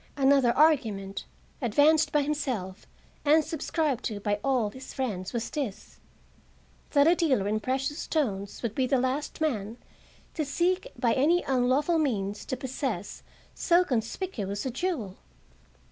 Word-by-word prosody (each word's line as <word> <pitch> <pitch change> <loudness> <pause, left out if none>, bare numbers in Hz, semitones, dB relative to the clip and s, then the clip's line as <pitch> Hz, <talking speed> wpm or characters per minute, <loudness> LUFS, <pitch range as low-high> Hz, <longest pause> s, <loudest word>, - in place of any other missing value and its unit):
Another 270 -3 +4
argument, 225 -11 +2 0.4
advanced 295 +6 +4
by 295 -1 +3
himself 255 -11 -3 0.4
and 310 +2 +5
subscribed 305 -4 -1
to 210 -3 -3
by 205 0 -1
all 250 -6 +1
his 260 +3 -10
friends, 205 -9 -3
was 235 -1 -3
this: 270 -10 -5 0.9
That 285 -2 +5
a 330 - +6
dealer 275 - +1
in 215 +1 0
precious 270 +6 -2
stones 205 -11 -2
would 230 -3 -1
be 260 +2 0
the 270 - +2
last 260 +4 -2
man 225 -7 -1 0.6
to 315 - -1
seek 355 +6 0
by 240 -2 +2
any 330 +7 +3
unlawful 270 +6 +2
means 210 -8 -1
to 260 - -3
possess 250 - -4 0.3
so 345 +1 +3
conspicuous 225 - -3
a 260 - -1
jewel. 255 - -3
260 Hz, 140 wpm, -28 LUFS, 215-300 Hz, 0.9 s, a